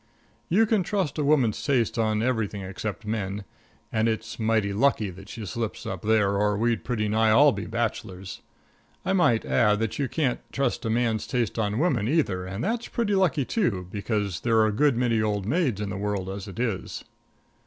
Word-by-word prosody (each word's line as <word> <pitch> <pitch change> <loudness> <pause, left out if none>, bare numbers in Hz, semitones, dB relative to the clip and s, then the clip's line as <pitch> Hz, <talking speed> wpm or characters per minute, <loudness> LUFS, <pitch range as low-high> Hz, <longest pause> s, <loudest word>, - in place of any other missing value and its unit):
You 210 +7 +4
can 215 -2 +2
trust 185 -5 -1
a - - +1
woman's 140 -7 +2
taste 125 -5 +1
on 110 -1 +1
everything 110 -5 -1
except 100 +4 -5
men; 105 -2 -3 0.5
and 110 0 +1
it's 110 +1 -4
mighty 110 -2 +1
lucky 110 -3 +2
that 95 +3 -13
she 110 0 -6
slips 110 +3 -4
up - - -4
there 105 -2 +2
or 105 0 +2
we'd 115 0 0
pretty 110 -4 -1
nigh 110 +1 +3
all 140 +7 +6
be - - -5
bachelors. 105 -5 -4 0.6
I 190 - +1
might 140 -12 +3
add 105 -3 +3
that 115 +3 -2
you 140 -3 0
can't 140 -6 0
trust 135 -2 -1
a - - 0
man's 115 -1 0
taste 120 -4 -1
on 105 -1 0
women, 130 - +1
either, 100 - 0
and 95 +3 -4
that's 230 +5 -1
pretty 225 -4 -1
lucky, 175 -8 +2
too, 115 - 0
because 100 -3 -2
there 115 -2 +1
are 110 - +5
a 110 - +1
good 140 +2 +3
many 120 -3 +2
old 105 -2 -1
maids 130 - +1
in 105 -2 -3
the 95 - -4
world 100 -2 -2
as 100 +1 -6
it 95 - -9
is. 115 -6 -3
110 Hz, 195 wpm, -26 LUFS, 105-130 Hz, 0.6 s, all